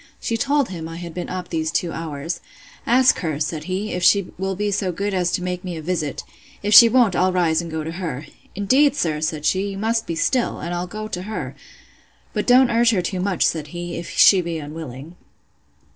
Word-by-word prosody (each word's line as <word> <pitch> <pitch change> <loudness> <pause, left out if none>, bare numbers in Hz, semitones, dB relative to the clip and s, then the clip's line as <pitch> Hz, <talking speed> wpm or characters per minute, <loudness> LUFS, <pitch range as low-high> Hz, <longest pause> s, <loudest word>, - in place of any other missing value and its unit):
She 230 - -2
told 280 +3 +1
him 165 -3 -6
I 165 - -7
had 170 -1 -7
been 180 - -5
up 185 0 -5
these 160 -1 -1
two 170 0 -1
hours. 165 0 -5 0.5
Ask 255 +2 +4
her, 155 -5 -3
said 155 0 -3
he, 190 +4 -3
if 180 - -3
she 195 +1 +3
will 190 0 -2
be 205 +2 -1
so 195 -2 -1
good 200 +3 -3
as 180 -2 0
to 180 - -1
make 180 0 -3
me 180 -3 -5
a - - -6
visit: 155 -4 -2 0.4
If 210 +1 +1
she 230 +2 +10
won't, 230 -6 +3
I'll 185 +1 +2
rise, 170 -3 +2
and 170 - -7
go 160 -1 -4
to 160 - -5
her. 165 -5 -5 0.3
Indeed, 265 +9 +3
sir, 155 - -1
said 155 -1 -2
she, 195 +2 +1
you 195 - -6
must 225 +2 -1
be 165 - -3
still; 240 +10 0
and 170 - -4
I'll 175 +1 -3
go 215 +4 -6
to 180 - -4
her. 215 +3 -5 0.8
But - - -2
don't 250 0 +6
urge 235 0 +4
her 195 -6 +1
too 185 +1 -3
much, 185 -1 +1
said 155 -3 -1
he, 175 +2 -6
if 170 - -6
she 190 -2 +6
be 170 -1 -4
unwilling. 155 +1 -8
180 Hz, 225 wpm, -21 LUFS, 165-205 Hz, 0.8 s, she